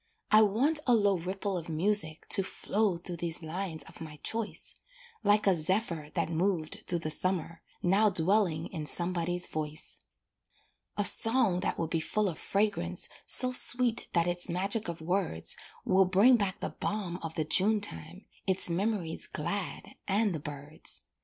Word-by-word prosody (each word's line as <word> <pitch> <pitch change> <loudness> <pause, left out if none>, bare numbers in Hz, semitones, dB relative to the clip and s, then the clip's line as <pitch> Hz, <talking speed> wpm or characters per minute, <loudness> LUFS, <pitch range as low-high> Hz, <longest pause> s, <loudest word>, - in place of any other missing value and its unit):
I 215 - +7
want 245 +10 +3
a 245 - +5
low 205 -2 +3
ripple 185 +2 -3
of 170 - -10
music 160 -1 +1
To - - +6
flow 195 0 -1
through 175 0 -8
these 170 0 -3
lines 165 0 -5
of - - -15
my 155 -2 -8
choice, 225 -1 -3 0.5
Like 205 0 +3
a 195 - +5
zephyr 170 -2 -1
that - - 0
moved 165 -1 -1
through 175 - -1
the 155 - +1
summer, 170 +1 -1 0.2
Now 200 +4 +4
dwelling 180 -2 +1
in 155 -4 -4
somebody's 175 +1 -1
voice; 155 -1 -5 1.0
A 205 - +2
song 225 -6 +3
that 185 - -2
will 165 - -1
be 165 +1 -1
full 210 +6 -1
of 160 - -7
fragrance 195 - -1 0.2
So 255 0 +8
sweet 245 -2 +3
that 170 -2 +2
its 175 +1 +1
magic 195 +5 -1
of 170 -1 -6
words 175 - +1 0.3
Will 190 0 +4
bring 200 +8 +5
back 200 -4 -1
the - - -3
balm 190 -4 -4
of 160 -1 -6
the 155 - -1
June 205 +7 +3
time, 185 -2 -3 0.2
Its 185 -2 +1
memories 185 -2 -2
glad, 190 +5 -4
and 205 0 +1
the 160 - -3
birds. 145 - -6
185 Hz, 165 wpm, -30 LUFS, 165-205 Hz, 1.0 s, So